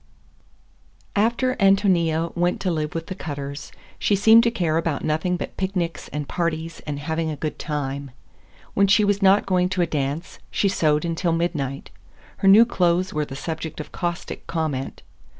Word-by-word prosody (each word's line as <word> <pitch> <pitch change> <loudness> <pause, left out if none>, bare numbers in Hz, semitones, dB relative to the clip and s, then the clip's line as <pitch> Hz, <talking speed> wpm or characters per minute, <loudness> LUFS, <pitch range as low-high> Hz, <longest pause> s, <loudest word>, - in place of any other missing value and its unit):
XII 65 -1 -34 0.2
AFTER 235 +3 +1
Ántonia 180 -5 +2
went 175 +1 +1
to 185 - 0
live 155 -1 -2
with 165 0 -3
the 185 - -5
Cutters, 140 -5 -6 0.3
she 205 - +2
seemed 220 +3 +7
to 235 - +2
care 170 -8 0
about 165 -3 -1
nothing 160 +4 0
but - - -6
picnics 180 -4 -2
and 150 -1 -5
parties 165 -1 -3
and 145 -1 -3
having 160 +2 -2
a 155 - -3
good 150 +1 -4
time. 140 -2 -3 0.6
When 200 0 +3
she 210 +2 +4
was 205 0 +1
not 195 +1 +5
going 180 -1 +2
to 185 -1 +1
a - - +2
dance, 145 +1 -3
she 200 - +1
sewed 155 -4 +1
until 170 0 0
midnight. 155 -5 -2 0.5
Her 195 - 0
new 210 +4 +8
clothes 180 -4 +1
were 150 0 0
the 135 - -8
subject 160 +2 -5
of 150 - -7
caustic 175 -2 -4
comment. 155 -5 -3
165 Hz, 175 wpm, -23 LUFS, 150-190 Hz, 0.6 s, new